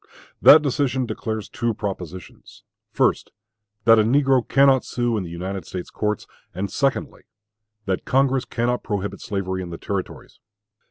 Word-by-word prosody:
That 150 +1 +9
decision 130 -2 0
declares 110 -1 -4
two 120 -1 -2
propositions 95 -4 -7 0.3
first, - - +1 0.5
that 115 0 +6
a - - +5
negro 135 +2 +3
cannot 135 -1 +4
sue 120 -1 -1
in 105 - -1
the 85 - -7
United 95 +3 -5
States 90 - -7
courts; 105 -1 -2 0.3
and 100 +2 -3
secondly, 135 -2 -1 0.6
that 95 -2 -1
Congress 135 -1 +1
cannot 120 +1 -1
prohibit 100 -1 -4
slavery 95 -4 -3
in 90 - -6
the 85 - -6
Territories. 100 +1 -6
110 Hz, 145 wpm, -22 LUFS, 95-130 Hz, 0.6 s, That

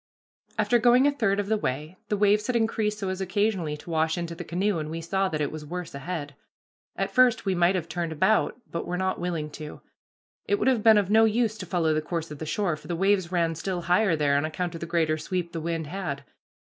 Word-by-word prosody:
After 240 - +3
going 245 +3 +5
a 290 - +5
third 220 -8 +1
of 205 - 0
the 215 +1 0
way, 150 +3 -3
the 210 - +1
waves 210 +1 +3
had 250 - 0
increased 220 -2 +1
so 195 -3 -3
as 190 0 -3
occasionally 190 -5 0
to 170 - -10
wash 160 +1 +1
into 170 -1 -3
the 165 - -7
canoe, 185 +1 0
and 155 0 -4
we 165 +1 -4
saw 190 +3 0
that 155 -3 -2
it 145 - -1
was 155 -1 -7
worse 175 +3 -6
ahead. 145 0 -5 0.6
At 195 0 -2
first 245 0 +4
we 195 - +1
might 175 +1 +3
have 170 -3 -2
turned 170 -2 -3
about, 190 +9 +2
but 170 - -4
were 180 - -2
not 190 0 -1
willing 165 -4 -3
to. 150 0 -8 0.7
It 410 - +2
would 405 - 0
have 255 -4 +3
been 220 0 +7
of 200 -1 +1
no 220 +1 +6
use 220 0 +1
to 185 - -6
follow 165 -3 +1
the 155 - +1
course 165 0 -4
of 150 - -8
the 160 - -5
shore, 185 -2 0
for 150 0 -14
the 170 - -2
waves 190 -1 +2
ran 170 -2 +1
still 175 +2 -3
higher 180 +1 +3
there 145 -2 +2
on 140 - +2
account 160 +3 -3
of 165 - -7
the 170 - -4
greater 160 -2 +1
sweep 175 +1 -3
the 165 - -4
wind 165 0 -2
had. 150 -4 -4
175 Hz, 250 wpm, -26 LUFS, 160-205 Hz, 0.7 s, been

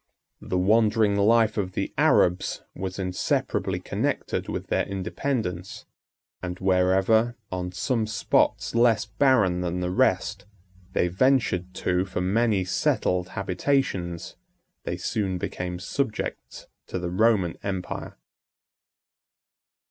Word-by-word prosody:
The 90 - -2
wandering 105 +2 +3
life 110 +2 +3
of 95 -3 -2
the - - -3
Arabs 90 +1 +2
was 95 -1 -5
inseparably 90 -2 -1
connected - - -2
with - - -3
their - - +1
independence; 95 -1 -3 0.6
and 90 -1 -4
wherever, 95 +5 +3 0.2
on 90 -1 -3
some 110 +5 -1
spots 110 +1 +1
less 115 -2 +3
barren 105 -11 +2
than 90 0 -2
the 90 0 -2
rest, 95 +2 +1 0.5
they - - +2
ventured 95 -3 +1
to 90 +1 0
for 95 -1 -4
many 100 +1 +1
settled 90 0 0
habitations, 95 -3 -1 0.5
they - - -2
soon 95 -4 -1
became 90 0 -4
subjects 110 +6 -4 0.2
to - - -4
the 90 -1 -3
Roman 95 -3 +2
empire. 95 -2 -5
95 Hz, 110 wpm, -25 LUFS, 90-110 Hz, 0.6 s, wandering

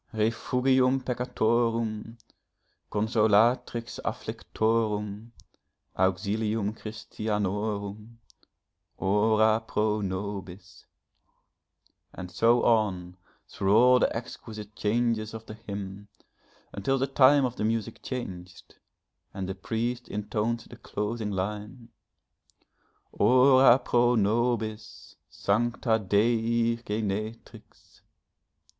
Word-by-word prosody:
'Refugium 130 +4 +2
peccatorum, 115 -2 -1 0.7
Consolatrix 110 +2 +1
afflictorum, 110 -1 -2 0.6
Auxilium 105 +3 0
Christianorum, 105 0 -4 0.8
Ora 110 +3 +3
pro 105 -1 -1
nobis!' 95 -1 -6 1.3
And 90 -1 -8
so 115 +6 +3
on 95 -6 +1 0.3
through 100 +1 +1
all 125 +2 +6
the - - +3
exquisite 110 -3 -8
changes 110 +1 0
of 110 0 -9
the 105 - -8
hymn, 100 -2 -7 0.7
until 135 +7 0
the 135 - +1
time 135 +1 +5
of 125 -1 -4
the - - -2
music 110 -1 -2
changed, 90 -9 -8 0.6
and 95 -1 -4
the 95 - -3
priest 120 +5 -3
intoned 105 +3 -2
the - - -13
closing 105 +1 -4
line. 105 +5 -5 1.2
'Ora 130 +2 +6
pro 120 -1 +2
nobis, 110 0 -1
Sancta 115 +2 0
Dei 115 +3 +1
Genetrix!' 110 0 -6
110 Hz, 85 wpm, -27 LUFS, 105-120 Hz, 1.3 s, all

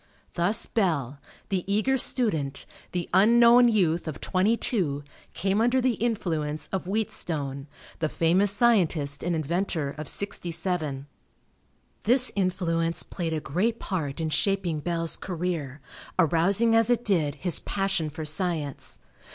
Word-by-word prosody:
Thus 180 +6 +1
Bell, 145 - -1 0.3
the 190 -3 -1
eager 215 +6 +2
student, 180 - 0 0.3
the 175 -2 -3
unknown 235 +5 +6
youth 175 -7 +1
of 155 - -5
twenty 200 +5 +1
two, 150 - -1 0.3
came 195 +3 0
under 245 +3 +3
the 255 -1 +2
influence 160 -10 -2
of 190 -2 -3
Wheatstone, 155 -9 -3 0.3
the 155 - 0
famous 180 +6 +2
scientist 180 -10 +2
and 175 -1 0
inventor 160 -1 -2
of 155 - -6
sixty 200 -3 -2
seven. 160 -6 -3 1.0
This 250 +3 +6
influence 170 -3 0
played 165 -3 -4
a 155 - -1
great 185 +11 -1
part 160 -8 -3
in 160 -1 -2
shaping 175 0 0
Bell's 165 +1 -1
career, 165 -6 -4 0.4
arousing 185 +7 +3
as 225 +1 +4
it 240 0 +1
did 160 -8 +1
his 175 +2 0
passion 195 -5 -1
for 155 +1 -7
science. 155 -2 -3
175 Hz, 135 wpm, -26 LUFS, 155-205 Hz, 1.0 s, unknown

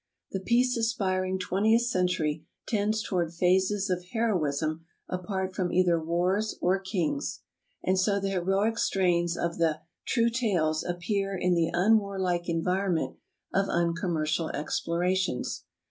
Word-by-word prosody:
The 195 - -2
peace 245 +5 +2
aspiring 190 -5 0
twentieth 210 +5 +2
century 180 -8 0 0.2
tends 215 0 0
toward 175 -4 0
phases 190 +3 +2
of 180 0 -1
heroism 160 -8 0 0.2
apart 190 +1 -3
from 180 -2 -1
either 175 -2 +3
wars 180 +6 0
or 185 +2 +2
kings, 190 - -2 0.4
and 185 0 +2
so 200 +1 +2
the 195 0 -2
heroic 195 +5 +1
strains 175 -3 +1
of 170 0 -2
the 160 -2 +1 0.3
"True 235 -2 +2
Tales" 180 -10 +1
appear 195 +3 -2
V 180 - -4
in 180 - +4
the 170 -2 +1
unwarHke 190 -3 +1
environment 180 +1 0 0.4
of 195 +1 +1
uncommercial 165 -2 0
explo - - -2
X 150 - -2
rations. 180 -4 -1
185 Hz, 135 wpm, -28 LUFS, 170-200 Hz, 0.4 s, in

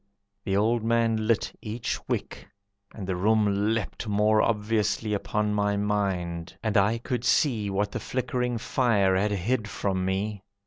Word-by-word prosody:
The 95 0 +1
old 110 +2 +2
man 115 -1 +1
lit 115 -2 +1
each 110 +2 -3
wick, - - -4 0.4
And 100 - -7
the 95 -1 -2
room 105 +1 +2
leapt 115 +1 -4
more 105 +1 +3
obviously 105 0 0
Upon 105 +1 -1
my 105 0 +1
mind, 95 -4 -2
and 110 -2 -1
I 105 +3 +4
could 120 0 -3
see 115 -9 +2
What 100 +1 -1
the - - -3
flickering 125 +1 -2
fire 115 -5 +2
had 100 +3 +2
hid 105 +3 -1
from 95 -2 -1
me. 100 +2 -2
105 Hz, 150 wpm, -27 LUFS, 100-115 Hz, 0.4 s, I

